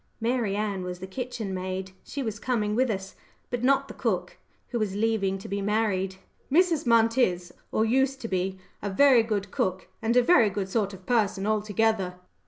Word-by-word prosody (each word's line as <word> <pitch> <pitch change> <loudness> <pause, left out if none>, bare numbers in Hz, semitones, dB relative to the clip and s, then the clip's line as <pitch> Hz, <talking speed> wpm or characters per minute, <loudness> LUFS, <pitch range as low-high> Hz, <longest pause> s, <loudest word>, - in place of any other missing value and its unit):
Mary 230 -3 0
Ann 205 -2 -1
was 180 0 -5
the 185 - -7
kitchen 225 -1 -5
maid. 185 0 -4
She 280 - -5
was 215 -3 -4
coming 215 -4 0
with 255 +3 +2
us, 195 -2 -3 0.4
but 245 -1 -2
not 275 +1 +3
the - - -8
cook, 185 -7 -2 0.3
who 240 - -2
was 205 -3 -1
leaving 205 -3 +1
to 190 - -9
be 200 0 -2
married. 200 -2 0 0.4
"Mrs. 330 -1 +3
Munt 230 +1 +4
is, 180 -6 +1 0.2
or 220 - +2
used 265 +3 +2
to 230 - -3
be, 190 -1 -1 0.2
a 205 - -2
very 255 +4 +6
good 205 -3 -2
cook, 185 0 -1
and 230 +2 +2
a 250 - +6
very 235 -8 +5
good 195 -1 -3
sort 200 -2 0
of 185 0 -16
person 210 -5 +1
altogether." 215 -2 +1
210 Hz, 190 wpm, -27 LUFS, 190-235 Hz, 0.4 s, very